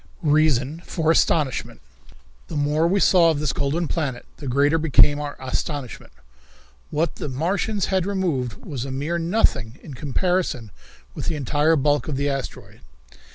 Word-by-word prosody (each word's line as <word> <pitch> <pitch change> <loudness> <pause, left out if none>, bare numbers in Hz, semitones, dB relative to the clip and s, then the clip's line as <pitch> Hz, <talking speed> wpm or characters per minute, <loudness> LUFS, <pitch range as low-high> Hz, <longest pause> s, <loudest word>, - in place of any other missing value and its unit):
Reason 150 -1 +2
for 160 -2 0
Astonishment. 150 -5 +1 0.7
The - - -7
more 150 +3 +2
we 195 +3 +2
saw 175 -3 +5
of 155 -3 0
this 150 -3 0
golden 155 +4 -1
planet 140 -7 -3
the 145 - -8
greater 145 +5 +2
became 145 -1 +4
our 145 -1 -5
astonishment. 130 0 -4 0.8
What 155 +1 -1
the - - -4
Martians 190 +9 -1
had 190 -1 +1
removed 170 - -2
was 135 -6 -4
a 135 - -5
mere 145 +6 -2
nothing 155 - +1
in 150 - -9
comparison 145 - -1 0.4
with - - -6
the 165 - 0
entire 150 +3 +2
bulk 145 0 +1
of 150 - -2
the 140 +1 0
asteroid. 135 -1 -6
150 Hz, 155 wpm, -23 LUFS, 135-165 Hz, 0.8 s, saw